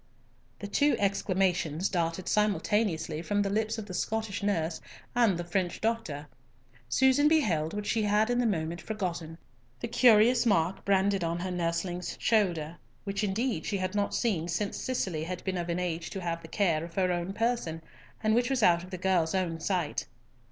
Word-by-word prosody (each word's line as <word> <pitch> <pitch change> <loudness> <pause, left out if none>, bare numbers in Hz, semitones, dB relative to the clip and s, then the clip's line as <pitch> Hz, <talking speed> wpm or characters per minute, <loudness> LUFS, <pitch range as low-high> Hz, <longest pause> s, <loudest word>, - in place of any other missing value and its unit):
The 205 - -6
two 285 +8 +3
exclamations 185 -4 +1
darted 170 0 -2
simultaneously 210 -6 +1
from 205 +3 0
the 195 - -1
lips 220 +2 0
of 220 - -5
the 190 - -8
Scottish 220 +2 -2
nurse 175 -5 -1 0.3
and 230 -7 +4
the 175 - -3
French 175 0 -1
doctor. 220 -11 -2 0.6
Susan 265 - +4
beheld 195 - +2
what 210 0 -3
she 220 +1 +1
had 210 +2 +2
at 245 - +1
the 245 - +2
moment 170 -4 -2
forgotten, 175 -6 -4 0.4
the 235 - -3
curious 235 0 +5
mark 185 -5 +1
branded 195 -1 +2
on 165 0 -1
her 185 0 -3
nursling's 175 +1 -2
shoulder, 175 -8 +1 0.3
which 200 0 -2
indeed 210 -2 -1
she 200 - 0
had 185 0 -2
not 205 -1 0
seen 190 -9 0
since 185 +4 -2
Cicely 185 -11 -2
had 180 +1 -5
been 190 -1 -2
of 175 0 -4
an 170 - 0
age 170 -2 -2
to 195 - -5
have 170 -1 -3
the 160 - -10
care 165 -4 +1
of 170 0 -9
her 185 -2 +2
own 175 +1 -2
person, 215 -7 -1 0.4
and 215 0 +3
which 245 +2 +2
was 260 -4 +1
out 170 -2 +5
of 185 - -10
the 185 - -5
girl's 180 -2 +1
own 170 -3 -1
sight. 175 -3 -1
190 Hz, 185 wpm, -29 LUFS, 170-215 Hz, 0.6 s, curious